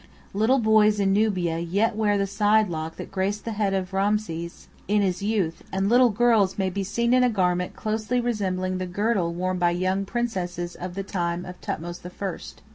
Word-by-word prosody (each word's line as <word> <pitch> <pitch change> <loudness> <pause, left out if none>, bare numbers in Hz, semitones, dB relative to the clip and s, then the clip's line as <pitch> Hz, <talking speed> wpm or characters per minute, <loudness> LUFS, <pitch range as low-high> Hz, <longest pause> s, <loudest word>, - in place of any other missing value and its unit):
Little 220 +7 +3
boys 215 -3 +4
in 195 -1 +2
Nubia 185 -6 +1
yet 200 +7 0
wear 210 -2 +2
the 200 - +1
side 210 +1 +2
lock 160 -1 -4
that - - -8
graced 195 +2 -2
the 230 - -2
head 205 -2 0
of 190 0 -3
Rameses 195 -4 -2 0.2
in 205 +1 +2
his 185 -1 -1
youth; 200 -6 -1
and 195 +1 0
little 245 +1 +6
girls 220 -3 +3
may 190 -2 0
be 195 +2 -2
seen 235 +5 0
in 255 0 +5
a 250 - +4
garment 180 -4 0
closely 220 +3 -1
resembling 185 -6 -1
the 185 - -3
girdle 195 -2 0
worn 185 +1 -2
by 175 -1 +3
young 185 +3 0
princesses 180 -7 -3
of 180 0 -7
the 195 - -3
time 175 -2 -2
of 180 0 -9
Thothmes 175 +2 -5
the 180 - -9
First. 190 0 -7
195 Hz, 200 wpm, -25 LUFS, 180-215 Hz, 0.2 s, little